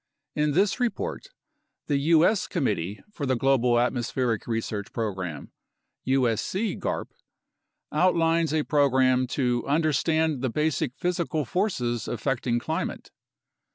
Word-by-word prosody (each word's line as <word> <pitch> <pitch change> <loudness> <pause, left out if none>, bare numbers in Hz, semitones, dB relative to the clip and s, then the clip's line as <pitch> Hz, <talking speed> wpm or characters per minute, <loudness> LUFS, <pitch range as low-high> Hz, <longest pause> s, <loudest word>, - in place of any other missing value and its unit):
In 150 -1 +1
this 195 - +2
report, 245 - -2 0.6
the 145 - +1
U.S. 165 +7 +3
Committee 105 - -2
for 145 -8 -4
the 130 - +2
Global 125 -1 +3
Atmospheric 120 -1 -1
Research 115 -3 -3
Program 95 -8 -4 0.6
(usogarp) 135 - 0 0.8
outlines 165 -1 +2
a 155 -1 +1
program 130 -3 +3
to 125 -2 0
"understand 155 0 +1
the 130 - 0
basic 150 -1 0
physical 170 -4 -1
forces 120 - -1
affecting 120 0 -1
climate." 120 - -4
135 Hz, 105 wpm, -26 LUFS, 120-160 Hz, 0.8 s, U.S